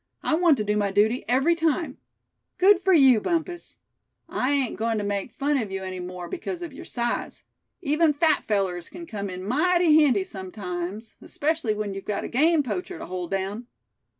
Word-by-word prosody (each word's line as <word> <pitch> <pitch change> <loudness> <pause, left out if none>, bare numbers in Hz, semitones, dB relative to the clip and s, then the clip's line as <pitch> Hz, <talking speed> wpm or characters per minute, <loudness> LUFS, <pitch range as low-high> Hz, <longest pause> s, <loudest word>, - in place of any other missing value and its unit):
I - - 0
want 325 -3 +4
to 215 - -1
do 210 0 0
my 205 -1 +1
duty 215 +5 +2
every 270 +8 +3
time." 330 0 -1 0.6
"Good 375 +1 +5
for 385 - +2
you, 265 - +6
Bumpus; 345 - -2 0.5
I 255 - -1
ain't 280 -4 0
goin' 225 0 -1
to 210 - -2
make 200 +3 -2
fun 285 0 0
of 215 -5 -4
you 190 0 -4
any 185 -1 -5
more, 180 0 -6
because 360 0 -5
of 330 -5 -7
your - - -10
size. 240 -1 -3 0.4
Even 310 +1 +3
fat 310 +2 +2
fellers 190 -5 -1
c'n 345 -1 -9
come 200 -8 -5
in 185 0 -6
mighty 315 - +4
handy 240 -10 +3
sometimes, 190 +2 -6
especially 295 -8 -1
when 210 -1 -3
you've 195 0 -7
got 210 - -2
a - - -3
game 310 +4 +3
poacher 200 -9 -4
to - - -7
hold 180 -1 -5
down." 195 +5 -3
235 Hz, 190 wpm, -25 LUFS, 195-315 Hz, 0.6 s, you